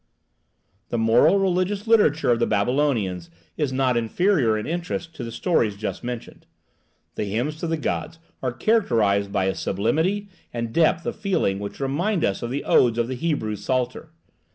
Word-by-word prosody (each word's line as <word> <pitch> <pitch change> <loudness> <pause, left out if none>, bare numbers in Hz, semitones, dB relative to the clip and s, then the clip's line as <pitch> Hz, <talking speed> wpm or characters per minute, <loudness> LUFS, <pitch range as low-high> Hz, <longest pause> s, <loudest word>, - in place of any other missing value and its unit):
The 120 - -1
moral 115 - +4
religious 195 +2 0
literature 205 - +3
of 120 - +2
the 115 - +2
Babylonians 105 - 0 0.3
is 150 -4 -1
not 130 -1 +1
inferior 120 - +2
in 105 - -4
interest 170 0 -4
to 125 - -6
the 115 - -5
stories 115 - 0
just 110 +4 -4
mentioned. 120 -1 -7 0.7
The - - -3
hymns 120 +10 -2
to 170 - -3
the 165 0 0
gods 160 +1 -3 0.2
are 130 - -1
characterized 115 - +1
by 95 - +1
a 95 - +1
sublimity 160 - 0 0.2
and 115 -1 -4
depth 165 0 +2
of - - -3
feeling 180 - 0
which 100 0 -7
remind 165 +8 0
us 95 - -1
of 120 - -3
the 140 +3 -3
odes 120 -2 +3
of 120 0 0
the 130 - -2
Hebrew 125 -7 -1
Psalter. 130 +7 -2
130 Hz, 170 wpm, -23 LUFS, 110-165 Hz, 0.7 s, moral